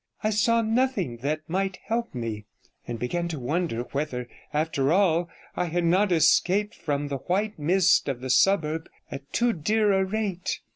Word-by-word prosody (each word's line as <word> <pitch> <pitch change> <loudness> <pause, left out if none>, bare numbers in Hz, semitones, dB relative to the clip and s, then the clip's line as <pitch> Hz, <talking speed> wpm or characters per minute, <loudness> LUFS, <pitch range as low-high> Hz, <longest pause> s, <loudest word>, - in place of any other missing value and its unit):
I 215 - +2
saw 230 +2 +3
nothing 220 - 0
that 150 +5 -3
might 190 +2 -1
help 230 - -2
me, 110 -3 -4 0.4
and 120 - -4
began 170 +9 -2
to 160 -4 -4
wonder 145 -2 -1
whether, 135 -4 -3 0.2
after 150 -2 0
all, 175 -2 +3 0.3
I 180 - 0
had 175 +1 -1
not 185 +4 +3
escaped 180 +5 +3
from 145 -1 -2
the 140 - -2
white 195 - -2
mist 180 +2 +3
of 130 -3 -3
the 130 0 -3
suburb 160 +1 +2 0.2
at 140 0 -8
too 240 0 +2
dear 210 +5 +1
a 190 0 +3
rate. 195 -2 -2
170 Hz, 165 wpm, -26 LUFS, 145-200 Hz, 0.4 s, saw